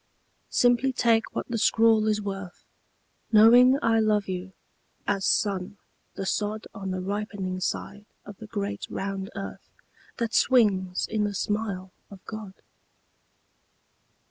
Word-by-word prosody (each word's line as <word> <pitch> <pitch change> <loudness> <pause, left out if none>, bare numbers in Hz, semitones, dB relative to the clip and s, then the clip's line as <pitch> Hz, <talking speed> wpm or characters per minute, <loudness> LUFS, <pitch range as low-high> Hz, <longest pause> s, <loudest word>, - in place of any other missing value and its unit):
Simply 245 +2 +3
take 230 -3 +1
what - - -3
the 235 -2 -2
scrawl 225 0 +4
is 210 -1 +1
worth 195 -2 -7 0.7
Knowing 240 +4 +7
I 225 -1 +3
love 210 -2 +2
you 185 0 -5 0.6
as 195 -1 0
sun 200 0 0 0.4
the 195 - -4
sod 210 +2 -2
On 195 -3 -6
the 185 0 -3
ripening 195 -1 -3
side 205 +2 -4 0.2
of 205 - -10
the 220 - -10
great 205 -1 -4
round 195 0 -4
earth 195 0 -7 0.5
That 230 -2 -2
swings 195 -7 +3
in 215 -1 -1
the 205 -1 -2
smile 200 -2 -2 0.2
of 195 -2 -14
God. 215 -3 -8
205 Hz, 130 wpm, -26 LUFS, 195-225 Hz, 0.7 s, Knowing